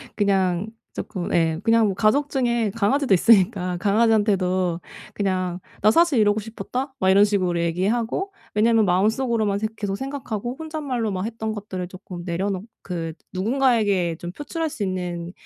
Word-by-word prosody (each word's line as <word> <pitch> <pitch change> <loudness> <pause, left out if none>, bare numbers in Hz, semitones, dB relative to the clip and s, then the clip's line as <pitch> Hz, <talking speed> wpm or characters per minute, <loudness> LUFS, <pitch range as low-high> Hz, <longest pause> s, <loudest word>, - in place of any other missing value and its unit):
그냥 190 -2 +1 0.3
쪼끔 185 -5 -4
예 160 -1 +2
그냥 225 0 +4
뭐 195 - -1
가족 260 +9 +2
중에 240 -5 +1
강아지도 240 +3 +2
있으니까 185 -2 +3
강아지한테도 195 -4 +2 0.3
그냥 185 -3 -1 0.2
'나 210 - +5
사실 330 -3 +4
이러고 210 0 +3
싶었다.' 250 +5 -5
막 190 - +2
이런 200 +2 +6
식으로 185 -4 0
얘기하고 220 - -1 0.2
왜냐하면 220 +1 +4
마음속으로만 215 +3 +1
생 220 +1 -1
계속 200 -2 -2
생각하고 250 -2 -4
혼잣말로 285 -9 -3
막 185 +1 -2
했던 220 -1 -3
것들을 190 -4 -5
쪼끔 185 -1 -9
내려놓 190 +2 -2 0.2
그 165 -3 -4 0.2
누군가에게 205 -5 +1
좀 175 - -6
표출할 320 - -3
수 225 - -4
있는 180 -2 -3
205 Hz, 355 characters per minute, -23 LUFS, 185-230 Hz, 0.3 s, 이런